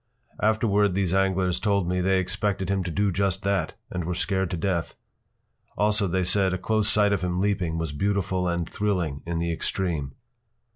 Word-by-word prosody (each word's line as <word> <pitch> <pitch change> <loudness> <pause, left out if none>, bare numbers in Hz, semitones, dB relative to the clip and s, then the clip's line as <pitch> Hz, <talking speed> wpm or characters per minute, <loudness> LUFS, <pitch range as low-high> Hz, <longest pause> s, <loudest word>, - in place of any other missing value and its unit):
Afterward 105 -3 +2
these 95 -2 +1
anglers 95 -2 +1
told 100 -4 +1
me 90 +1 0
they 95 +1 +2
expected 95 +1 -1
him 95 -1 0
to - - -2
do 100 +4 +1
just 95 0 0
that 95 -4 0 0.2
and 90 -1 -2
were 90 +2 -2
scared 95 -1 0
to 85 - -3
death. 85 -1 -1 0.8
Also 105 -1 +2
they 95 +1 0
said 95 0 +2
a - - -1
close 110 +3 +1
sight 105 -1 +4
of 100 - 0
him 90 0 -1
leaping 95 -5 0
was 80 -2 -2
beautiful 95 +2 0
and 85 -1 -1
thrilling 90 -9 -1
in 85 -1 -2
the 85 0 -1
extreme. 80 -5 -2
95 Hz, 185 wpm, -25 LUFS, 85-100 Hz, 0.8 s, sight